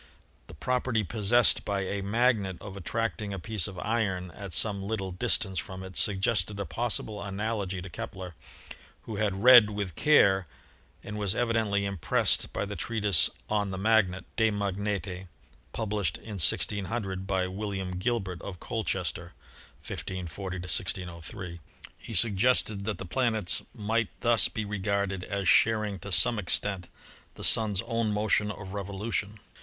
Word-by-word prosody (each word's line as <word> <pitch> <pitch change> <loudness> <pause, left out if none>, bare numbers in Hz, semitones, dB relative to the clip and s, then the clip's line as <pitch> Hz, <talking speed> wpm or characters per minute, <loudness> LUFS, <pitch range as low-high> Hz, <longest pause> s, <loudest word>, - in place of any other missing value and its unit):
The - - -11
property 125 -3 0
possessed 110 +4 +2
by 100 -1 -1
a 100 +1 -3
magnet 105 -2 +1
of 100 -1 -9
attracting 105 +2 -3
a - - -5
piece 105 +1 0
of 95 -2 -9
iron 95 -5 -1
at 100 +2 -9
some 100 +4 +1
little 100 -2 -3
distance 95 +1 -1
from 95 +5 -7
it 95 -1 -10
suggested 100 0 +1
a 100 - -2
possible 110 -2 -3
analogy 100 -2 -3
to - - -7
Kepler, 90 +1 -7 0.7
who 110 - -6
had 100 -1 -1
read 120 -4 +9
with 100 -4 -4
care 95 - +4 0.6
and 105 +1 -6
was 100 0 +2
evidently 110 -4 +1
impressed 100 -6 0
by - - -2
the 105 +1 -6
treatise 105 -3 +1 0.2
'On 105 -2 0
the 95 - -4
Magnet' 95 -3 +2
('De 110 -1 +4
Magnete'), 100 -2 -3 0.4
published 105 -7 -2
in 105 -3 -8
1600 95 +1 0
by 95 -2 0
Will 100 +3 -4
iam 95 -2 -4
Gilbert 95 -5 -2
of 90 -3 -8
Colchester 95 -5 -3 0.5
(1 - - -5
540 95 +1 -5
1603). 85 -1 -3 0.4
He 115 - -5
suggested 105 0 +3
that 110 -1 -2
the - - -6
planets 110 -2 +1
might 110 +1 -1
thus 115 -1 +5
be 110 - -4
regarded 100 -2 -2
as 100 -1 -3
sharing 110 -3 +4
to 100 - -8
some 95 +6 +4
extent 95 -1 0 0.5
the - - -8
Sun's 105 -3 +6
own 115 -2 -1
motion 105 0 +3
of 100 -2 -7
revolution. 100 +1 -3
100 Hz, 150 wpm, -28 LUFS, 95-110 Hz, 0.7 s, read